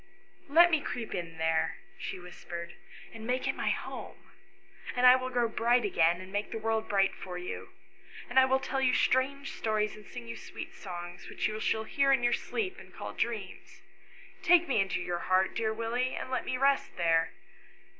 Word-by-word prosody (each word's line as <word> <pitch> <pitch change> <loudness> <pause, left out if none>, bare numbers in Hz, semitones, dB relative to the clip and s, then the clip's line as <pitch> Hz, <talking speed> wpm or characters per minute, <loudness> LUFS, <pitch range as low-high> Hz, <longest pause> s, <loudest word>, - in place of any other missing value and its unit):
" - - -33
Let 345 +4 +7
me 315 -2 +3
creep 230 -5 -4
in 165 -3 -5
there," 160 0 +1 0.2
she - - -4
whispered, 175 -1 -8 0.2
" - - -16
and 225 0 -8
make 255 +1 0
it - - +1
my - - -1
home; - - -5 0.6
and 250 0 +3
I 250 0 +10
will 255 0 -2
grow 245 -2 +1
bright 235 +1 +2
again, 170 -3 +3
and 185 0 -10
make 205 +1 -2
the - - -4
world 220 0 -1
bright 195 -1 +3
for 180 -1 -7
you; 180 0 -6 0.6
and 255 +2 +4
I 260 - +7
will 265 0 +3
tell 265 0 -2
you 255 -1 +3
strange 275 +2 +1
stories, 215 -1 0
and 215 - -12
sing 115 - -8
you 115 - -5
sweet - - -8
songs, 175 -2 -8
which - - -1
you 215 0 -4
shall 220 0 0
hear 275 +5 +2
in 265 -3 +3
your 240 0 +3
sleep, 385 -4 -2
and - - -14
call - - -7
dreams. - - -4 0.6
Take 345 -1 +5
me 250 -7 +3
into 190 -1 -1
your 175 -1 -2
heart, 185 +1 +2
dear 220 -1 0
Willie, 230 +3 -1
and - - -5
let 255 - -1
me 255 - -1
rest 275 +1 +2
there." 165 -1 +3
220 Hz, 205 wpm, -30 LUFS, 180-255 Hz, 0.6 s, I